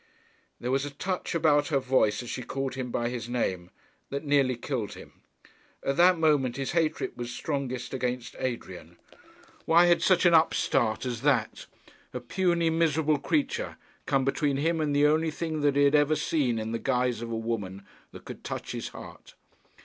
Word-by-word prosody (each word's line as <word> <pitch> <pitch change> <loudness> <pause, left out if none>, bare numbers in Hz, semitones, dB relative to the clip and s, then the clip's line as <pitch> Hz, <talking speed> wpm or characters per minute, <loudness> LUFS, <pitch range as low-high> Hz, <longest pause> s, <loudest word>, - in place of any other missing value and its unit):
There 125 - -3
was 135 +1 +1
a 145 - -4
touch 180 +5 -4
about 150 -3 +3
her 145 - +1
voice 130 -4 +1
as 120 - -8
she - - -4
called 135 +2 -4
him 130 -1 -4
by 120 0 -1
his 120 -1 -5
name, 95 -8 -2 0.4
that 140 +2 -4
nearly 140 -3 +2
killed 120 -4 -4
him. - - -14 0.6
At 135 - 0
that 180 +1 +6
moment 150 -6 +2
his 135 -1 -2
hatred 160 -2 0
was 120 -1 -5
strongest 130 0 -4
against 125 -1 -3
Adrian. 90 -9 -5 0.7
Why 170 +2 +6
had 175 -1 +4
such 185 -2 +3
an 175 - +6
upstart 130 -8 +2
as 120 -2 -3
that, 130 -6 0 0.5
a - - -2
puny, 170 +5 +1
miserable 160 -2 +2
creature, 465 - -1 0.3
come 135 -2 +2
between 140 0 0
him 165 +3 0
and 145 -2 0
the 145 +1 +4
only 155 +2 +3
thing 155 0 -3
that 145 -1 +2
he 145 - +4
had 140 0 +4
ever 150 +1 +4
seen 135 -8 0
in 110 0 -3
the 115 - -2
guise 125 -3 0
of 120 - -5
a 115 - -2
woman 105 -4 -4 0.3
that - - -12
could - - -9
touch - - -5
his - - -4
heart? - - -12
135 Hz, 185 wpm, -27 LUFS, 120-155 Hz, 0.7 s, that